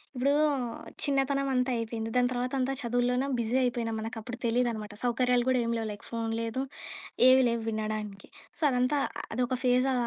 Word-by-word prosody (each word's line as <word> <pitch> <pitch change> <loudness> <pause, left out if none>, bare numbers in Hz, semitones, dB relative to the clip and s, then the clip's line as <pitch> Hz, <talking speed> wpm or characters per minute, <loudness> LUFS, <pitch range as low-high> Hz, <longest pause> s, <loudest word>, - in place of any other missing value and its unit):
ఇప్పుడూ 260 +3 +2 0.7
చిన్నతనమంతా 270 -2 +1
అయిపోయింది. 225 0 -3
దాని 250 0 +4
తర్వాతంతా 255 +2 -1
చదువులోనా 245 +2 +1
బిజీ 235 +1 -1
అయిపోయినాం, 235 -2 -1
మనకప్పుడు 225 +2 -6
తెలీదనమాట. 230 -3 0
సౌకర్యాలు 245 0 +2
గూడా 260 -1 +3
ఏమీ 230 0 0
లేవు 225 -1 -2
లైక్ 205 - -9
ఫోను 230 -1 -2
లేదు, 230 +3 -2 0.7
ఏవీ 260 +1 +7
లేవు 235 0 -1
వినడానికి. 215 -2 -4 0.3
సో, - - -9
అదంతా 255 +3 +2 0.4
అదొక 250 0 0
ఫేజా 255 +1 +3
245 Hz, 145 wpm, -29 LUFS, 225-255 Hz, 0.7 s, ఏవీ